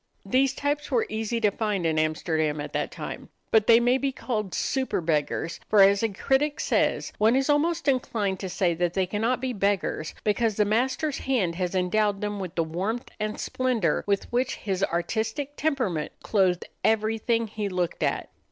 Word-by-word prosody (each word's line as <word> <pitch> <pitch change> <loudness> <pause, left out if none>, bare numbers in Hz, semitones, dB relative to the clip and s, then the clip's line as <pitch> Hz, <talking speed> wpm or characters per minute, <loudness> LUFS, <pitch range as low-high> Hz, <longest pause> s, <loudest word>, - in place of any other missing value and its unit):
These 270 +1 +2
types 290 +1 -1
were 245 -5 +2
easy 220 +2 -2
to 210 -2 +3
find 205 -4 -1
in 160 -1 +2
Amsterdam 155 -1 0
at 145 - -6
that - - -1
time; - - -7 0.2
but 220 -1 +4
they 230 0 +8
may 245 +2 +3
be 275 0 0
called 215 -7 -3
super 265 -5 0
beggars, 160 0 -1
for 205 -2 +7
as 200 0 +5
a 225 - +1
critic 280 +9 0
says, - - 0
"One 220 +3 +4
is 270 +2 +2
almost 330 +3 +1
inclined 215 -8 0
to 190 - -4
say 180 -2 +1
that 175 +1 -1
they 190 -1 +2
cannot 220 +6 0
be 260 -1 -2
beggars, 200 -6 -1
because 220 0 +1
the 210 - +3
master's 260 +7 0
hand 225 -11 0
has 180 +1 -2
endowed 200 +2 +1
them 205 0 -3
with 185 -2 -6
the 165 - +2
warmth 190 +9 -3
and 215 0 -3
splendor 240 -11 0
with 200 -1 +1
which 250 +1 0
his 195 -2 -2
artistic 220 +11 -2
temperament 250 - -1
clothed 185 -4 +2 0.2
everything 225 +1 +1
he 210 -1 -4
looked 180 -2 -2
at." - - -1
215 Hz, 180 wpm, -26 LUFS, 185-250 Hz, 0.2 s, they